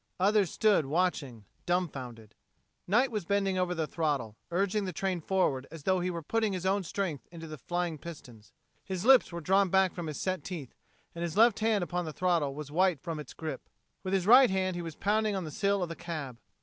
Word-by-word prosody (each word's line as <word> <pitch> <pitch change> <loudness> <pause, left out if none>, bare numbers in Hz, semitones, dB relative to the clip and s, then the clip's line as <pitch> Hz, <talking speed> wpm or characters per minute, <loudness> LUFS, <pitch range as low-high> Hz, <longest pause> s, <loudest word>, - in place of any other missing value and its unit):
Others 200 -1 +3
stood 200 -8 +2
watching, 145 - -1 0.2
dumfounded. 130 - -3 0.5
Knight 240 +7 +3
was 210 -4 -2
bending 195 0 0
over 180 -1 0
the 160 -1 -1
throttle, 145 -10 -2
urging 195 +3 0
the 185 - -3
train 185 0 -2
forward 150 -8 0
as 160 -2 -10
though 185 +2 +2
he 180 +1 -1
were 170 -2 -4
putting 220 +4 0
his 185 -1 -4
own 195 +2 +2
strength 170 - -3
into 165 -1 -9
the 155 -2 -8
flying 175 +1 -2
pistons. 125 -10 -11 0.3
His 190 0 -4
lips 260 -5 +6
were 170 0 -5
drawn 190 +3 +3
back 190 0 +3
from 175 -2 -5
his 150 - -5
set 185 -1 -2
teeth, 165 -9 -7 0.4
and 170 - -7
his 170 +1 -3
left 225 -1 +5
hand 215 -3 +2
upon 175 0 -2
the 155 - -5
throttle 165 -6 +1
was 150 -1 -7
white 180 -1 +2
from 160 +2 -5
its 150 - -9
grip. 160 -1 -6 0.3
With 190 0 -1
his 185 -2 0
right 250 +4 +8
hand 185 -1 0
he 175 - -3
was 165 -2 -6
pounding 215 0 +1
upon 190 - -2
the 155 - -6
sill 200 +3 +1
of 175 - -3
the 165 - -5
cab. 155 -9 -6
180 Hz, 215 wpm, -30 LUFS, 155-195 Hz, 0.5 s, right